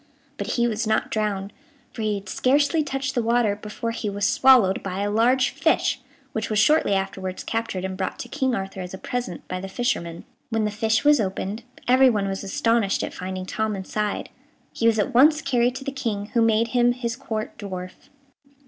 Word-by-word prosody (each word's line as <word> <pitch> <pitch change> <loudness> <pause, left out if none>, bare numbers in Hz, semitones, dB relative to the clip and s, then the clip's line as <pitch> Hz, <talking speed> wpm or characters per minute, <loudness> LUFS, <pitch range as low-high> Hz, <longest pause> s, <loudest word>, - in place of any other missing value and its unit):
But - - -3
he 240 -1 +2
was 220 -1 -2
not 220 0 +1
drowned, 205 -2 -2 0.4
for 230 - -6
he 215 -1 0
had 200 -1 -7
scarcely 285 - +2
touched 270 -1 -3
the 245 - +1
water 230 -2 +2
before 210 +3 -5
he 230 -2 -3
was 200 0 -1
swallowed 250 -8 +5
by 195 0 -4
a 205 0 0
large 250 +4 +3
fish, 280 -2 +1 0.3
which 220 -4 -3
was 215 - 0
shortly 225 -1 +4
afterwards 190 -1 -3
captured 225 -5 -3
and 190 0 -4
brought 185 0 -3
to - - -6
King 265 -4 0
Arthur, 195 -1 -5
as 180 +1 -6
a - - -8
present, 240 -5 -5
by 185 - -4
the 190 - -6
fisherman. 170 -7 -2 0.3
When 225 -2 0
the 210 - -1
fish 220 +1 +1
was 295 -4 +6
opened, 195 +2 -3 0.3
everyone 250 -5 +4
was 195 0 -3
astonished 230 -2 +1
at - - -4
finding 185 0 -5
Tom 220 +2 -2
inside. 205 +2 -3 0.4
He 230 - +1
was 225 -1 +4
at 215 +5 0
once 300 +5 +6
carried 245 -3 +1
to 270 - -6
the 275 - -3
King, 220 -6 -3
who 235 - +3
made 225 0 +3
him 245 0 +3
his 235 -2 -3
Court 220 -5 -5
dwarf. 185 -3 -7
220 Hz, 200 wpm, -24 LUFS, 195-245 Hz, 0.4 s, was